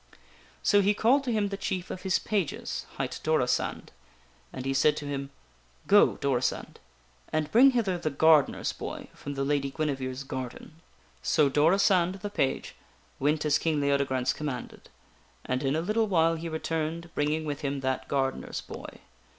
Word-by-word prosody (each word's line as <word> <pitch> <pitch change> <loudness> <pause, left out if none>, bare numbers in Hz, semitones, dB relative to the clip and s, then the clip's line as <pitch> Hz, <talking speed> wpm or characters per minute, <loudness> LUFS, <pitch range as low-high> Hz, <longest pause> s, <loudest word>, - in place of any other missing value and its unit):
So 205 -1 +5
he 205 +1 +2
called 260 +7 +3
to 245 - 0
him 210 -3 +1
the 195 - -4
chief 185 -2 -3
of 185 - -6
his 190 -1 +2
pages, 200 -9 -3
hight - - -3
Dorisand, 155 -6 0 0.6
and 130 - -7
he 135 - 0
said 145 +2 +3
to 145 - -5
him: 140 -1 -4 0.3
" - - -32
Go, - - +6
Dorisand, 130 -3 -1 0.5
and 155 -1 -1
bring 255 +5 +7
hither 210 -9 0
the 155 - -1
gardener's 155 0 +3
boy - - -7
from 145 0 -7
the 135 - -1
Lady 140 -1 0
Guinevere's 135 -3 -3
garden." 130 +3 -7 0.4
So 145 - +3
Dorisand, 180 +4 +3
the 205 - -4
page, 135 -9 -1 0.5
went 150 +3 +1
as 150 -1 +3
King 160 -2 0
Leodegrance 140 -3 +1
commanded, 140 -5 -6 0.6
and 130 0 -1
in 135 +1 0
a 160 - 0
little 215 +5 +1
while 165 -4 +3
he 165 +1 -4
returned, 160 +1 -3
bringing 155 +2 0
with 145 0 -4
him 140 -2 -2
that 130 -1 -2
gardener's 135 -1 -2
boy. - - -10
150 Hz, 165 wpm, -28 LUFS, 135-175 Hz, 0.6 s, bring